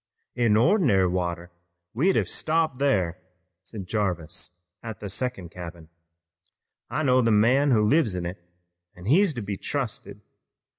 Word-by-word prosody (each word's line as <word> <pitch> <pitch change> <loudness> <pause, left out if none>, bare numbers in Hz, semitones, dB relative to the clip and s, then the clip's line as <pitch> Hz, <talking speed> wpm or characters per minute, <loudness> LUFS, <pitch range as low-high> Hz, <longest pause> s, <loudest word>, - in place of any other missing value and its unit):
"In 115 -3 +3
ordinary 125 - +4
water 90 -1 -3 0.4
we'd 165 - +2
have - - +1
stopped 155 -4 -1
thar," 95 -11 +1 0.4
said 95 +1 -7
Jarvis 90 -3 -4 0.2
at 115 -2 -7
the 100 - -6
second 125 -7 -3
cabin. 85 -2 -9 1.0
"I 155 - -1
know 130 -2 +4
the 115 - +2
man 120 +7 +4
who 110 -5 +4
lives 115 - +3
in 90 -1 -3
it 85 +1 -6 0.5
an' 90 - -12
he's 175 - +4
to 120 - -3
be 100 -1 -4
trusted. - - -4
105 Hz, 145 wpm, -25 LUFS, 90-130 Hz, 1.0 s, ordinary